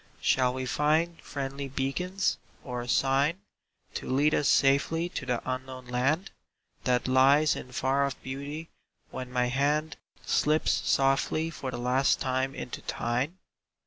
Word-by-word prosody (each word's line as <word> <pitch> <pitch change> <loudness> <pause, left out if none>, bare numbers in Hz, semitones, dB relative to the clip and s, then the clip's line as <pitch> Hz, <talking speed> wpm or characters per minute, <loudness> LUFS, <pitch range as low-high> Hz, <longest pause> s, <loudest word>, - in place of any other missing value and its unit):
Shall 125 -1 +2
we 130 0 -3
find 155 +6 +1
friendly 140 0 -5
beacons, 180 +9 -1 0.2
or 125 -2 -4
a 120 - -7
sign 135 +6 +2 0.6
To - - -5
lead 145 +4 +3
us 145 - +2
safely 155 +5 +3
to 140 -6 -6
the 125 -2 -1
unknown 130 0 -5
land 135 +9 0 0.5
That 125 0 +2
lies 135 +4 +5
in 125 - -8
far 135 +2 +1
off 135 - -6
beauty, 140 +5 -6 0.4
when 125 -1 -6
my 125 -1 +1
hand 145 +5 0 0.3
Slips 155 +1 +2
softly 135 +4 +1
for 135 -2 -5
the 125 - -5
last 125 +2 +2
time 130 +1 -1
into - - -6
thine? 125 +9 -2
135 Hz, 145 wpm, -28 LUFS, 130-150 Hz, 0.6 s, lies